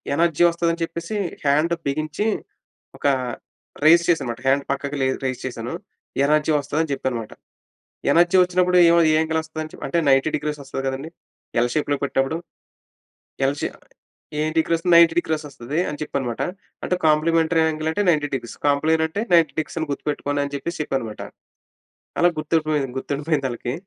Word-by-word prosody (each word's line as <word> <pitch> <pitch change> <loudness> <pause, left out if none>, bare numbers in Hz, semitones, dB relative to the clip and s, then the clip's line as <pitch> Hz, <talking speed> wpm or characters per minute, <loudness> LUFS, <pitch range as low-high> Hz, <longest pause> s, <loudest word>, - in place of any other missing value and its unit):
Energy 170 +1 +2
వస్తదని 170 0 -1
చెప్పేసి 170 +5 -5 0.3
hand 150 +4 +3
బిగించి 155 +7 -2 0.7
ఒక - - -3 0.8
రైస్ 170 +2 +7
చేశానన్నమాట 125 -9 0
హ్యాండ్ 140 +1 +3
పక్కకి 140 +1 -3 0.3
రైస్ 130 -1 -3
చేశాను. 120 +1 -5 0.5
ఎనర్జీ 150 +2 +2
వస్తదని 150 +3 -1
చెప్పాననమాట. 125 -5 -3 0.8
ఎనర్జీ 175 +4 +4
వచ్చినప్పుడు 180 0 +2
ఏ, - - +6 0.2
ఏ - - +3
యాంగిల్ 160 0 0
వస్తాది? 155 0 -7
అంటే 170 - -1
90 135 +3 +4
డిగ్రీస్ 150 0 -3
వస్తది 135 0 -5
కదండీ! 135 +4 -4 0.5
ఎల్ 120 - +1
షేప్‌లో 145 -1 +1
పెట్టినప్పుడు. 135 +2 0 1.1
ఎల్ 140 +1 0
షేప్ - - -3 0.6
ఎం 155 - +1
డీగ్రీస్ 165 +1 +1
90 170 -1 +7
డీగ్రీస్ 160 -2 -1
వస్తది 140 +2 -5
అని 150 - -5
చెప్పాననమాట. 130 -6 -3 0.4
అంటే, - - 0
కాంప్లిమెంటరీ 160 +2 +3
యాంగిల్ 155 0 -1
అంటే 185 +6 0
90 150 -4 +3
డిగ్రీస్. 120 -4 -4
కాంప్లెయిన్ 155 +3 +2
అంటే 170 +6 -4
90 165 -2 +5
డిగ్రీస్ 155 +1 -2
అని 160 - -3
గుర్తుపెట్టుకోండి 145 0 -2
అని 140 - -6
చెప్పేసి 170 +5 -4
చెప్పానన్నమాట. 125 -7 -4 1.0
అలా 175 - +5
గుర్తుండి 155 -3 0
గుర్తుండిపోయిందాళ్ళకి. 135 -4 -2
155 Hz, 140 wpm, -22 LUFS, 140-165 Hz, 1.1 s, రైస్